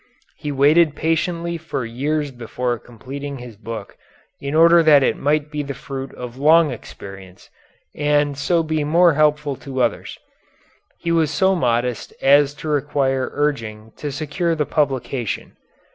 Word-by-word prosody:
He 150 Hz, -, -5 dB
waited 150 Hz, +3 st, +4 dB
patiently 170 Hz, +2 st, -1 dB
for 155 Hz, -6 st, -4 dB
years 145 Hz, +5 st, -2 dB
before 120 Hz, 0 st, -3 dB
completing 135 Hz, +5 st, -8 dB
his 120 Hz, -3 st, -10 dB
book 110 Hz, -1 st, -8 dB, 0.4 s
in 140 Hz, +2 st, -4 dB
order 170 Hz, +1 st, +7 dB
that 150 Hz, -4 st, +6 dB
it -, -, +2 dB
might 150 Hz, +1 st, 0 dB
be 150 Hz, -1 st, -2 dB
the 140 Hz, -1 st, -5 dB
fruit 135 Hz, -1 st, -6 dB
of 125 Hz, 0 st, -8 dB
long 155 Hz, +1 st, +5 dB
experience, 95 Hz, -5 st, -11 dB, 0.4 s
and 145 Hz, -1 st, +1 dB
so 165 Hz, +5 st, +1 dB
be 155 Hz, -1 st, -1 dB
more 170 Hz, +3 st, +4 dB
helpful 150 Hz, -1 st, +2 dB
to 135 Hz, -2 st, -6 dB
others. 115 Hz, -3 st, -2 dB, 0.8 s
He 170 Hz, -, -3 dB
was 165 Hz, -2 st, +2 dB
so 190 Hz, +6 st, +2 dB
modest 120 Hz, -, -1 dB
as 140 Hz, +1 st, +4 dB
to 155 Hz, -, -8 dB
require 140 Hz, -3 st, 0 dB
urging 115 Hz, -7 st, -2 dB
to 145 Hz, -, -4 dB
secure 155 Hz, +4 st, -1 dB
the 150 Hz, -2 st, 0 dB
publication. 135 Hz, -6 st, -2 dB
145 Hz, 145 wpm, -21 LUFS, 130-155 Hz, 0.8 s, order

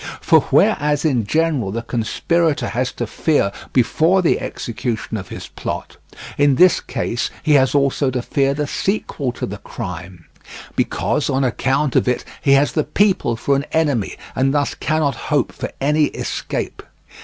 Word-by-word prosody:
For -, -, +5 dB
whereas 150 Hz, +1 st, +3 dB
in 125 Hz, -9 st, +1 dB
general 155 Hz, -9 st, +1 dB
the 115 Hz, +4 st, -3 dB
conspirator 140 Hz, +8 st, 0 dB
has 125 Hz, +2 st, -1 dB
to 120 Hz, -, -3 dB
fear 130 Hz, -3 st, +1 dB, 0.2 s
before 160 Hz, +9 st, +3 dB
the 165 Hz, -, +2 dB
execution 115 Hz, -1 st, -4 dB
of 95 Hz, -3 st, -5 dB
his -, -, -8 dB
plot, -, -, -6 dB, 0.4 s
in 145 Hz, -2 st, +4 dB
this 180 Hz, +6 st, +5 dB
case 115 Hz, -, -2 dB
he 155 Hz, -, +1 dB
has 135 Hz, -1 st, +4 dB
also 140 Hz, 0 st, +2 dB
to 125 Hz, -1 st, -2 dB
fear 140 Hz, +1 st, +1 dB
the 150 Hz, +1 st, -1 dB
sequel 145 Hz, -, -2 dB
to -, -, -4 dB
the 100 Hz, +1 st, -7 dB
crime; 90 Hz, -4 st, -7 dB, 0.5 s
because 150 Hz, -, 0 dB
on 135 Hz, 0 st, +1 dB
account 135 Hz, +3 st, 0 dB
of -, -, +3 dB
it 125 Hz, -, 0 dB, 0.2 s
he 140 Hz, -, +4 dB
has 140 Hz, +1 st, +4 dB
the 155 Hz, -, +1 dB
people 180 Hz, -, +1 dB
for 140 Hz, +5 st, +1 dB
an 140 Hz, +2 st, -2 dB
enemy, 145 Hz, -10 st, +1 dB, 0.2 s
and 135 Hz, +2 st, +1 dB
thus 145 Hz, -1 st, +1 dB
cannot 155 Hz, -2 st, 0 dB, 0.2 s
hope -, -, +1 dB
for -, -, -6 dB
any 150 Hz, +2 st, +3 dB
escape. -, -, -4 dB
140 Hz, 165 wpm, -19 LUFS, 120-150 Hz, 0.5 s, For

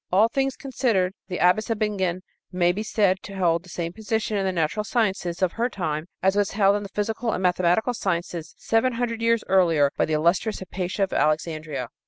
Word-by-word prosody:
All 205 Hz, +5 st, +5 dB
things 270 Hz, +2 st, 0 dB
considered, 230 Hz, -9 st, 0 dB
the 180 Hz, -2 st, -4 dB
Abbess 180 Hz, +6 st, +3 dB
of 225 Hz, -, 0 dB
Bingen 190 Hz, -4 st, -1 dB, 0.3 s
may 175 Hz, -1 st, +2 dB
be 195 Hz, +4 st, -4 dB
said 205 Hz, -3 st, +2 dB
to 200 Hz, -, -9 dB
hold 170 Hz, -3 st, +2 dB
the 185 Hz, -, -16 dB
same 170 Hz, 0 st, -4 dB
position 220 Hz, 0 st, -2 dB
in 200 Hz, -, 0 dB
the 190 Hz, -, 0 dB
natural 170 Hz, +4 st, -1 dB
sciences 195 Hz, -6 st, -1 dB
of 180 Hz, -, +2 dB
her 235 Hz, +2 st, -1 dB
time 155 Hz, -6 st, -3 dB, 0.2 s
as 190 Hz, +1 st, +3 dB
was 205 Hz, -1 st, +1 dB
held 200 Hz, -1 st, +4 dB
in 205 Hz, -, -1 dB
the 200 Hz, -, -7 dB
physical 225 Hz, +3 st, -2 dB
and 185 Hz, -, -3 dB
mathematical 180 Hz, +6 st, +2 dB
sciences 170 Hz, -6 st, -3 dB
seven 230 Hz, +3 st, +1 dB
hundred 230 Hz, -1 st, -2 dB
years 230 Hz, -1 st, +2 dB
earlier 165 Hz, -7 st, +4 dB
by -, -, +3 dB
the 155 Hz, -, -2 dB
illustrious 170 Hz, +8 st, +1 dB
Hypatia 190 Hz, +1 st, -3 dB
of 195 Hz, -, -2 dB
Alexandria. 155 Hz, -3 st, -1 dB
190 Hz, 205 wpm, -24 LUFS, 175-220 Hz, 0.3 s, All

